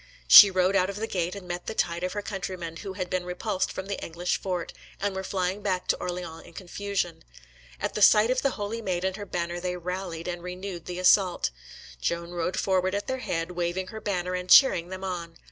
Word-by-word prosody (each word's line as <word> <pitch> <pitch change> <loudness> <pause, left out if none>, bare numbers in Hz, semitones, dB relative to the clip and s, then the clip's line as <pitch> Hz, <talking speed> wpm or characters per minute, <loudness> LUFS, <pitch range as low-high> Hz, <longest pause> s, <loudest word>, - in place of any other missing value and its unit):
She 200 - +11
rode 185 +1 +2
out 185 -1 +3
of 200 - -5
the 215 +2 -2
gate, 180 -4 -2
and 195 -3 -9
met 175 0 -5
the 220 - -4
tide 170 -2 -1
of 185 - -2
her 205 0 -4
countrymen, 185 -5 -5
who 190 +3 -6
had 185 -1 -4
been 185 0 -1
repulsed 180 +2 -2
from 190 - -5
the 200 0 -5
English 175 +2 -2
fort, 180 -3 -3 0.3
and 200 0 -1
were 190 - -3
flying 190 +1 -2
back 185 -3 -1
to - - +3
Orleans 175 -2 -5
in - - -15
confusion. 190 -1 -4 0.6
At - - -2
the 210 - -3
sight 215 +3 +6
of 255 - +1
the 275 - 0
Holy 210 +2 -3
Maid 185 -3 -2
and 190 -1 -1
her 205 0 -7
banner 175 -1 -3
they 180 0 -3
rallied 180 -1 -5
and 175 -1 -4
renewed 180 -1 -7
the 180 -1 -5
assault. 185 - +3 0.5
Joan 170 0 -2
rode 175 +1 -2
forward 185 0 +1
at 205 - -2
their 260 0 -3
head, 165 -7 -3
waving 180 +1 -2
her 220 +2 -8
banner 180 -3 -2
and 180 0 -4
cheering 180 -11 +7
them 185 0 -7
on. 170 -3 -5
185 Hz, 225 wpm, -27 LUFS, 175-195 Hz, 0.6 s, She